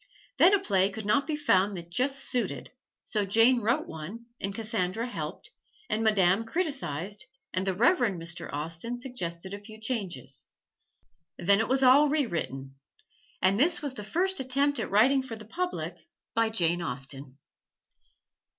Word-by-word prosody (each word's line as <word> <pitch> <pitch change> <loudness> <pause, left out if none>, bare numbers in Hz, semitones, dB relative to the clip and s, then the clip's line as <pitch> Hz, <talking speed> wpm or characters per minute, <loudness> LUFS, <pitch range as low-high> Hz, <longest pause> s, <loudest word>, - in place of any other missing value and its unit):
Then 360 - +8
a - - +1
play 195 - +2
could 205 +1 -7
not 275 +7 +2
be 310 - 0
found 200 -9 +2
that 170 0 -9
just 270 +8 +1
suited, 235 - -3 0.3
so 210 -2 -1
Jane 230 +5 +4
wrote 235 +8 +1
one 175 +9 -8
and 195 - -2
Cassandra 220 -1 -1
helped, 160 -9 -5 0.4
and 220 - +1
Madame 200 -1 +4
criticized 225 - -3 0.3
and 185 +1 -1
the 190 - +1
Reverend 235 - +3
Mr. 170 +1 -5
Austen 165 +11 -4
suggested 190 -8 -5
a 200 - -5
few 215 +1 -12
changes. 190 - -4 0.9
Then 200 +3 +3
it 225 - +1
was 265 +1 +2
all 280 +4 +7
rewritten. 135 - -2 0.6
And 190 +2 +4
this 325 +3 +3
was 285 -3 -2
the 210 - -6
first 370 - 0
attempt 275 +1 +1
at - - -2
writing 250 +7 +4
for 260 -3 -7
the 215 -1 -11
public 360 - -4 0.3
by 225 -1 +2
Jane 175 -5 +2
Austen. 135 -1 -5
215 Hz, 155 wpm, -28 LUFS, 175-260 Hz, 0.9 s, Then